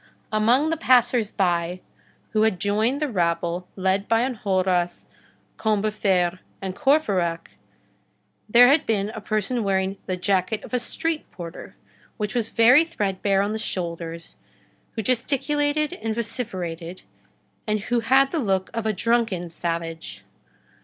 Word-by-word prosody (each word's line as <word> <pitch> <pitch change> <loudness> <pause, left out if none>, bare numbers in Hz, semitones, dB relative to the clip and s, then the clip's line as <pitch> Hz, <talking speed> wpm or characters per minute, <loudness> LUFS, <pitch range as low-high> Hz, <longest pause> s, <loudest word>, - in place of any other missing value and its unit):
Among 240 +8 +3
the 325 - 0
passers 245 -5 +3
by 175 -2 0 0.5
who 215 - +1
had 220 -4 +2
joined 215 +7 +1
the - - +1
rabble 175 -4 -1
led 190 +1 0
by 230 +1 +3
Enjolras, 185 -7 0 0.5
Combeferre, 200 -4 +1 0.2
and 190 -1 -5
Courfeyrac, 195 - +1 1.0
there 245 +3 +8
had 290 +2 +3
been 205 -2 0
a 220 - -7
person 215 +3 -1
wearing 190 0 0
the 185 -1 -2
jacket 190 +3 0
of - - -11
a 250 - +2
street 320 +5 -2
porter, 170 -2 -9 0.4
which 210 -2 -2
was 235 -3 -1
very 245 +8 +6
threadbare 195 - 0
on 205 +1 -2
the 220 - -3
shoulders, 170 -4 -5 0.6
who 220 - -3
gesticulated 290 - 0
and 225 -11 -4
vociferated, 185 -7 -4 0.6
and 215 -1 0
who 240 +3 0
had 265 +4 +3
the 330 - -1
look 190 -6 0
of 230 -1 -2
a 215 - +1
drunken 210 -5 0
savage. 165 - -4
210 Hz, 135 wpm, -24 LUFS, 185-240 Hz, 1.0 s, there